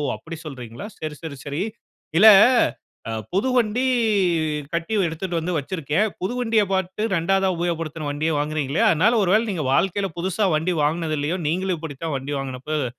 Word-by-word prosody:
அப்படி 165 0 -9
சொல்றீங்களா? 125 - -8
சரி, 155 -1 -5
சரி, 150 -4 -7
சரி. 145 +4 -3 0.6
இல்ல, 215 +4 +8 0.8
ஆ - - -3 0.2
புது 205 +8 +1
வண்டி 240 +1 +2 0.9
கட்டி 170 +6 -2
எடுத்துட்டு 170 +2 -3
வந்து 175 +2 -3
வைச்சிருக்கேன். 160 +6 -1
புது 190 +6 -2
வண்டியப் 225 -5 +1
பார்த்து, 190 +2 -2
2வதா 190 +2 +2
உபயோகப்படுத்தின 165 -3 -3
வண்டிய 155 +3 -1
வாங்குறேன்னீங்களே! 150 +4 -1
அதனால, 185 +7 +3
ஒருவேள 210 +5 +3
நீங்க 165 -5 -2
வாழ்க்கைல 195 +3 +1
புதுசா 190 +4 0
வண்டி 170 +4 0
வாங்கினது 155 +1 0
இல்லையோ. 155 +6 -1
நீங்களும் 180 +2 0
இப்படி 155 -4 -7
தான் 160 -3 -2
வண்டி 135 +2 -5
வாங்கின 130 -2 -5
போது, 155 -3 0
170 Hz, 155 wpm, -23 LUFS, 150-190 Hz, 0.9 s, இல்ல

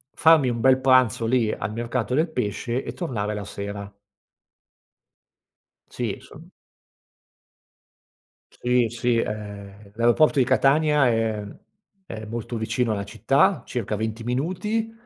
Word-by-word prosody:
farmi 160 -5 +5
un 120 -1 -2
bel 130 +2 +4
pranzo 130 -4 +3
lì 115 -2 +2
al 100 - -4
mercato 120 +1 -2
del 160 +3 +1
pesce 120 0 -2
e - - -6
tornare 105 - -3
la 105 - -4
sera. 100 0 -7 2.0
Sì, - - -3
inso - - -14 2.1
Sì, 125 -1 +2
sì, 120 +1 0
ehm, 100 -2 -6
l'aeroporto 120 +7 +3
di 130 - +4
Catania 140 +2 +3
è 115 -2 0
mhmm, 100 -1 -10 0.5
è 110 -9 -7
molto 115 +2 -5
vicino 115 +1 -1
alla 100 -2 -2
città, 140 - +2
circa 110 -3 -3
20 110 +2 -4
minuti, 185 - -2
120 Hz, 125 wpm, -24 LUFS, 105-130 Hz, 2.1 s, farmi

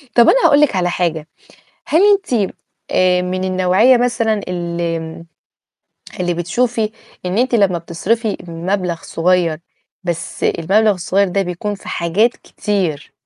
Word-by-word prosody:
طَب 235 -1 +6
أنا - - +4
هاقول 285 +1 +5
لِك 290 -9 +3
على 175 -1 +1
حاجة، 165 -3 -2 0.6
هل 325 - +3
أنتِ 250 - 0 0.4
آآ، 180 -1 +3
من 185 +1 -3
النوعية 185 +7 +3
مثلًا 240 -2 +1
ال 170 -2 -4 1.0
اللي 175 -1 0
بتشوفي 220 +6 -1 0.4
إن 180 +4 -1
أنتِ 250 0 +1
لمّا 195 -6 +3
بتصرِفي 205 +7 -2
مبلغ 175 0 -2
صغيّر، 170 -2 +1 0.5
بس 170 -2 -4
المبلغ 200 +6 +2
الصغيّر 190 +2 +1
ده 195 +2 0
بيكون 185 +3 -4
في 195 - -12
حاجات 185 +8 +1
كتير، 180 -8 -3
185 Hz, 130 wpm, -17 LUFS, 170-220 Hz, 1.0 s, طَب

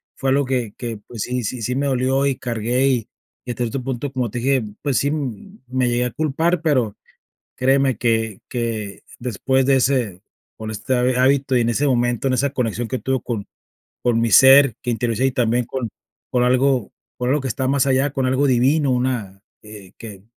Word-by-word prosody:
Fue 135 - -2
algo 140 +1 +2
que 125 -5 -2
que, 115 -2 -4
pues, 115 -4 -5
sí 125 -1 -2
sí 120 +3 -4
sí 125 +3 -2
me 140 +1 0
dolió, 130 +1 +1
y 135 -2 0
cargué, 120 +2 0
y 125 -5 0 0.3
y 125 - -5
hasta 120 +1 -2
este 120 +4 -3
punto, 130 +2 -4
como 125 -4 -1
te 125 - -3
dije, 130 0 +1 0.2
pues, 140 -3 0
sí 140 +1 +1
me 130 - -3
llegué 120 +1 +1
a 125 - -2
culpar, 160 +4 0
pero 130 -10 +1 0.6
créeme 135 0 +2
que 115 -3 0
que 115 -5 -4
después 130 +2 0
de 135 0 +4
ese 125 -8 0 0.4
con 110 0 -6
este 110 +5 -3
ha 125 - +2 0.2
hábito 135 0 +2
y 120 - +4
en 115 - +1
ese 140 +5 +1
momento, 120 0 +1
en 130 - +1
esa 140 +2 +1
conexión 120 -3 -2
que 130 - -2
tuve 130 -2 -1
con 110 -5 -4 0.5
con 120 -2 +1
mi 115 -1 0
ser 135 -2 +7
que 125 - -4
interioricé, 120 +2 0
y 135 - 0
también 120 -1 +1
con 125 -1 -4 0.4
con 125 -1 +2
algo 130 -1 +2 0.3
con 125 0 -1
algo 145 +1 +2
que 135 - -3
está 130 +2 -2
más 140 0 +2
allá, 135 +1 +2
con 135 -2 -1
algo 130 +2 +2
divino, 135 +4 +3
una, 120 -7 -2 0.2
eh, 105 -3 -12
que 100 -4 -10
125 Hz, 205 wpm, -21 LUFS, 115-135 Hz, 0.6 s, ser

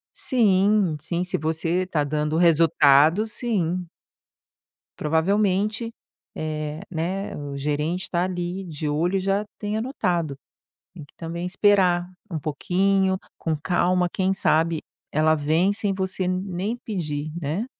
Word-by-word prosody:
Sim, 205 - +3
sim. 170 +3 -2
Se 180 - -1
você 165 +4 0
tá 155 -5 0
dando 150 +2 -1
resultado, 165 +1 +5
sim. 185 -6 -1 1.1
Provavelmente, 200 +7 +1 0.4
eh, 155 0 -4
né, 185 +4 -3
o 145 -1 -6
gerente 150 +5 -2
tá 175 0 +1
ali 180 +1 -3
de 155 -3 -5
olho 170 +6 +1
e - - +1
já 195 +2 0 0.2
tenha 210 +1 -2
notado. 175 - -1 0.6
Tem 170 -5 -10
que 145 - -18
também 170 +1 -5
esperar 180 -2 +3 0.2
um 160 - -2
pouquinho, 190 +5 +1 0.2
com 160 -1 -1
calma, 180 +2 +1
quem 190 0 +1
sabe 165 -3 +2 0.3
ela 155 +1 +4
vem 160 +7 +2
sem 205 -1 -1
você 190 -1 -2
nem 185 +4 -2
pedir, 155 -7 -3
né? 160 +9 -2
175 Hz, 130 wpm, -24 LUFS, 155-195 Hz, 1.1 s, resultado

